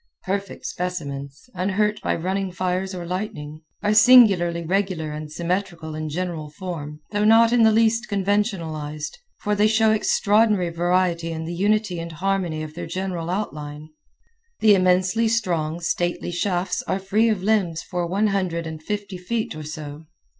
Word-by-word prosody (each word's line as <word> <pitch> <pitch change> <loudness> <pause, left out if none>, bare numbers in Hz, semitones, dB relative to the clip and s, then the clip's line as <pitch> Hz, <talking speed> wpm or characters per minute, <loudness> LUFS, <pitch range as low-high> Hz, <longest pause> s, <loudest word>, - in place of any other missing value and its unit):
Perfect 195 0 -4
specimens, 140 - -5
unhurt 200 +3 0
by - - 0
running 190 +3 -2
fires 185 +1 -2
or 175 -1 -5
lightning, 160 -5 -5 0.2
are 210 - +2
singularly 205 -8 +6
regular 185 -4 -1
and 150 0 -6
symmetrical 170 -1 -3
in 155 0 -4
general 165 -2 -4
form 155 -3 -7
though 210 0 0
not 225 +2 +6
in 245 - +4
the 220 -1 +6
least 230 +2 +2
conventionalized, 185 - -2 0.2
for 210 - 0
they 210 +1 +4
show 220 0 +3
extraordinary 210 -3 +3
variety 175 -1 +1
in 160 0 -4
the 170 - -4
unity 200 0 +1
and 165 0 -6
harmony 175 -2 -1
of 155 -1 -8
their 170 0 -6
general 175 -1 -3
outline. 150 -6 -4 0.7
The 215 -1 +6
immensely 185 +4 +3
strong, 170 -8 0
stately 175 +1 -1
shafts 180 0 -1
are - - 0
free 205 +4 +2
of 205 -4 -1
limbs 190 -6 +1
for 175 -1 -3
one 200 +5 +1
hundred 180 -4 -1
and 160 -1 -6
fifty 200 +1 -4
feet 220 +5 -2
or 155 - -6
so. 150 0 -7
180 Hz, 155 wpm, -23 LUFS, 165-205 Hz, 0.7 s, singularly